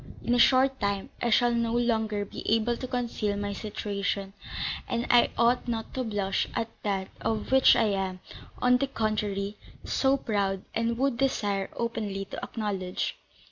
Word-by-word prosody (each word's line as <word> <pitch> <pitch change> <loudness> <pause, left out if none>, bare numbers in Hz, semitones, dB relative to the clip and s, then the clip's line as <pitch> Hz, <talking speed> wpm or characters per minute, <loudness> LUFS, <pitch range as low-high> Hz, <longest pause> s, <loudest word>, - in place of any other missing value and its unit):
In 240 - +1
a 245 - +3
short 265 +2 +5
time, 200 -2 -1
I 240 - +1
shall 240 +1 +4
no 235 -1 0
longer 220 -4 +1
be - - -8
able 225 +2 +2
to 255 - -5
conceal 235 -5 -1
my 205 0 -2
situation; 200 -1 -3 0.5
and 235 +1 -1
I 240 -1 +6
ought 240 +2 +3
not 225 -2 -3
to 260 - -1
blush 205 -4 -1
at 225 - -1
that 195 -2 -1
of 220 +1 -2
which 265 0 +7
I - - +3
am, 190 -2 -2 0.4
on 250 0 +5
the 275 +2 0
contrary, 210 -4 -1 0.3
so 270 0 +2
proud, 200 -6 -1
and 230 0 0
would 265 -1 +1
desire 205 -7 0
openly 210 -4 -2
to - - -6
acknowledge." 195 -5 -3
220 Hz, 165 wpm, -28 LUFS, 200-240 Hz, 0.5 s, which